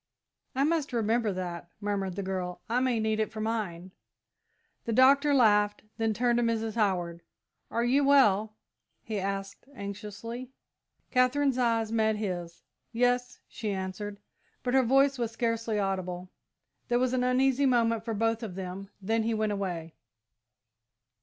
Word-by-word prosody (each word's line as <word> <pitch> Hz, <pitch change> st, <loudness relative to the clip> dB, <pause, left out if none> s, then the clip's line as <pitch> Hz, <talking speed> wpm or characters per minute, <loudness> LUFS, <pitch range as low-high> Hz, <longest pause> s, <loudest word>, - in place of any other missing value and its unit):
"I 270 Hz, -, +2 dB
must 305 Hz, -3 st, 0 dB
remember 225 Hz, -1 st, +1 dB
that," 175 Hz, -2 st, -5 dB
murmured 200 Hz, -3 st, -2 dB
the 200 Hz, -, -3 dB
girl. 185 Hz, -2 st, -4 dB
"I 235 Hz, +3 st, +1 dB
may 255 Hz, -3 st, +1 dB
need 220 Hz, 0 st, 0 dB
it 215 Hz, -, 0 dB
for 215 Hz, -, -7 dB
mine." 205 Hz, -5 st, -3 dB, 0.9 s
The 230 Hz, -, -2 dB
Doctor 275 Hz, +4 st, +5 dB
laughed, 210 Hz, -5 st, +4 dB
then 225 Hz, -1 st, +1 dB
turned 240 Hz, +3 st, +1 dB
to 240 Hz, -, +2 dB
Mrs. 225 Hz, -1 st, 0 dB
Howard. 180 Hz, -6 st, 0 dB, 0.5 s
"Are 235 Hz, -, 0 dB
you 265 Hz, +4 st, +3 dB
well?" 220 Hz, -7 st, +4 dB, 0.5 s
he 215 Hz, -2 st, -3 dB
asked 195 Hz, +3 st, -4 dB
anxiously. 210 Hz, +4 st, -6 dB, 0.6 s
Katherine's 255 Hz, +1 st, +2 dB
eyes 230 Hz, -2 st, +1 dB
met 220 Hz, -1 st, +2 dB
his. 180 Hz, -5 st, -4 dB, 0.3 s
"Yes," 245 Hz, +1 st, 0 dB
she 220 Hz, -, -5 dB
answered, 195 Hz, +1 st, -4 dB, 0.5 s
but 250 Hz, -, -1 dB
her 265 Hz, -, +6 dB
voice 270 Hz, +2 st, +3 dB
was 235 Hz, -2 st, 0 dB
scarcely 230 Hz, -2 st, -1 dB
audible. 185 Hz, -2 st, -2 dB, 0.6 s
There 240 Hz, -, +2 dB
was 255 Hz, 0 st, +1 dB
an 250 Hz, -1 st, +1 dB
uneasy 265 Hz, +2 st, +3 dB
moment 230 Hz, -3 st, +2 dB
for 225 Hz, -1 st, -3 dB
both 225 Hz, +2 st, +1 dB
of 210 Hz, -6 st, -6 dB
them, 190 Hz, +1 st, -6 dB
then 225 Hz, +3 st, +1 dB
he 225 Hz, 0 st, 0 dB
went 215 Hz, -1 st, 0 dB
away. 175 Hz, -5 st, -3 dB
220 Hz, 150 wpm, -29 LUFS, 195-245 Hz, 0.9 s, her